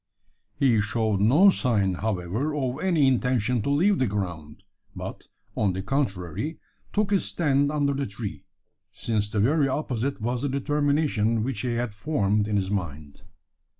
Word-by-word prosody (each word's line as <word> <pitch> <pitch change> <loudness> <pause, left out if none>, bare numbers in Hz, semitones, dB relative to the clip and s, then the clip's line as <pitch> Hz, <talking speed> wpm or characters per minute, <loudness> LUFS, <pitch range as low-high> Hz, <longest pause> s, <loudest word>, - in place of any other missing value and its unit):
He 120 -6 +3
showed 110 -1 0
no 145 - +6
sign, 105 - +1
however, 105 - -2
of 130 -1 -2
any 170 -6 +3
intention 125 -2 +1
to 120 - -2
leave 180 +8 +3
the 130 - +2
ground; 85 -7 -5 0.3
but, - - -7 0.3
on 100 -3 +1
the 95 +1 -4
contrary, 120 - -2 0.3
took 210 -1 0
his 200 - +2
stand 145 -3 +1
under 145 -2 +1
the 140 0 -2
tree: 100 -6 -7 0.5
since 105 -3 -2
the 105 - -1
very 140 +7 +3
opposite 135 -1 -2
was 120 +2 -2
the 145 - -1
determination 140 -5 +1
which 125 -3 -3
he 125 -2 -1
had 120 -2 -2
formed 105 -4 0
in 105 - -1
his 95 -1 0
mind. 75 -7 -5
120 Hz, 155 wpm, -25 LUFS, 105-140 Hz, 0.5 s, no